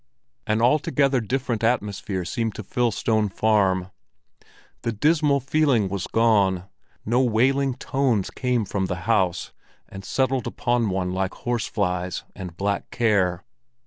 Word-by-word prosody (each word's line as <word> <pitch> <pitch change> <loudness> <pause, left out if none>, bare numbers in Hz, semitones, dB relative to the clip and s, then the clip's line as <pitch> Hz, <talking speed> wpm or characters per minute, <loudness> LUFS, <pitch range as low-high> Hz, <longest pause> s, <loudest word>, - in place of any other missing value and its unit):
An 110 +1 +1
altogether 135 0 +2
different 120 0 -2
atmosphere 105 -5 -1
seemed 110 +5 -2
to 110 - -6
fill 120 +4 0
Stone 110 0 0
Farm. 95 -3 +1 0.9
The 115 - -1
dismal 150 +4 +2
feeling 135 -6 +2
was 100 0 -3
gone; 100 -5 +2 0.4
no 120 +4 +2
wailing 130 +3 +2
tones 130 -6 0
came 125 -4 0
from 95 -1 -2
the 90 -1 -4
house 95 -6 +1 0.4
and 95 0 -10
settled 130 +2 0
upon 120 -3 0
one 95 -1 -1
like 95 0 -2
horse 120 -2 -2
flies 90 -3 -2
and 90 -4 -8
black 100 0 -2
care. 100 -7 +1
110 Hz, 135 wpm, -24 LUFS, 95-125 Hz, 0.9 s, altogether